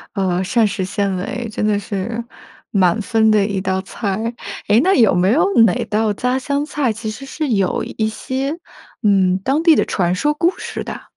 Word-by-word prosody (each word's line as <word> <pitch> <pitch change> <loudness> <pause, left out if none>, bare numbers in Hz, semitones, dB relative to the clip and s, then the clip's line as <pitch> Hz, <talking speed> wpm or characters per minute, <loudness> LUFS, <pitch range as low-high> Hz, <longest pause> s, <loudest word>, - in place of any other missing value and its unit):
呃， 185 -3 0
膳 230 +2 +2
食 195 -2 -2
纤 200 0 -1
维， 230 +6 -4
真 215 - -2
的 210 -1 +2
是 205 +4 -4 0.5
满 190 +1 +2
分 220 0 +2
的 210 -2 +4
一 200 -2 -2
道 190 0 -1
菜。 215 +3 -3 0.3
诶， 215 +3 +5
那 380 +5 +3
有 225 -6 +4
没 185 +4 +3
有 330 +8 +3 0.2
哪 190 -6 +1
道 215 0 0
家 250 +5 -1
乡 280 +2 -1
菜， 290 -5 -1
其 220 0 -5
实 260 +6 -8
是 300 +2 -3
有 195 -5 +1
一 220 -1 -2
些， 265 +6 -3 0.5
嗯， 190 -3 +3
当 280 +5 +1
地 330 -2 +6
的 - - +2
传 175 -2 0
说 295 +10 +1
故 345 +4 +1
事 - - -5
的？ - - -7
215 Hz, 210 characters per minute, -18 LUFS, 195-255 Hz, 0.5 s, 地